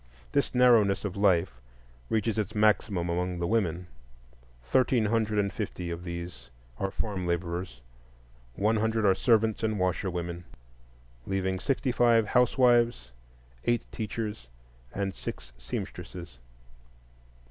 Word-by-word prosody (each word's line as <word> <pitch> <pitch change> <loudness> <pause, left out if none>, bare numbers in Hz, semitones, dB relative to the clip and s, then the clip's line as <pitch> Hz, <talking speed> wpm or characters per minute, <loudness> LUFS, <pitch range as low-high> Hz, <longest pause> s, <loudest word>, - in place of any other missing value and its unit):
This 140 -2 0
narrowness 115 -6 +5
of 100 - -3
life 90 -10 +2 0.5
reaches 110 0 0
its 110 +1 -3
maximum 105 -4 +2
among 90 +1 -1
the 85 - -2
women: 90 -4 0 0.8
thirteen 120 - +2
hundred 110 -1 +1
and 100 -1 +1
fifty 90 -5 -4
of 85 +1 -5
these 85 -8 -7 0.3
are 95 - 0
farm 95 -3 -3
laborers, 85 -4 -3 0.7
one 110 +2 +2
hundred 110 0 +1
are 95 - +6
servants 110 +2 +2
and 110 -1 0
washerwomen, 90 -2 -2 0.8
leaving 95 -1 -1
sixty 135 +1 0
five 120 -2 +4
housewives, 120 - +3 0.5
eight 120 -1 +2
teachers, 105 - -4 0.4
and 100 -1 -2
six 60 -2 -7
seamstresses. 60 +4 -7
100 Hz, 115 wpm, -28 LUFS, 85-110 Hz, 0.8 s, are